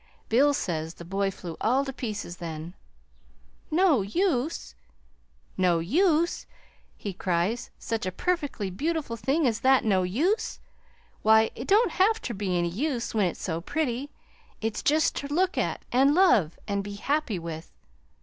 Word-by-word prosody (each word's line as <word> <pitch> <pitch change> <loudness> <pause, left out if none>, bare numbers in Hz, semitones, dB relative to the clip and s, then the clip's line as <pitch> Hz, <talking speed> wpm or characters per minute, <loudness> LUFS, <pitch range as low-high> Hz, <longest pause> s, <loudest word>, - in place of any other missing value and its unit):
"Bill 275 +6 +5
says 165 - -3
the 170 - -10
boy 195 +2 0
flew 175 -4 -8
all 260 +5 +2
to 270 - -5
pieces 210 -8 -5
then. 165 0 -6 1.0
'No 325 - +4
use 300 - -1 0.8
no 180 -2 +3
use!' 325 - +1 0.5
he 200 - -5
cries; 185 +5 -1
'such 225 -5 -3
a - - -1
perfectly 290 - -2
beautiful 295 - -2
thing 270 +8 +1
as 230 -3 +1
that 265 -1 +4
no 195 -4 +3
use! 290 - 0 0.6
Why, 220 +1 +5
it 245 - -7
don't 430 +4 +4
have 430 +4 +3
ter 240 - -5
be 190 -3 -1
any 175 0 +1
use 240 - -2
when 210 -4 +2
it's 175 - -6
so 165 -1 -2
pretty. 280 - -2 0.5
It's 220 0 -2
jest 310 +1 +2
ter 280 - -3
look 355 +6 +1
at - - -2
an' 275 +4 +4
love, 225 - +4
an' 200 -1 0
be 200 +1 -7
happy 275 -1 -1
with!' 165 -1 -7
230 Hz, 155 wpm, -27 LUFS, 185-295 Hz, 1.0 s, Bill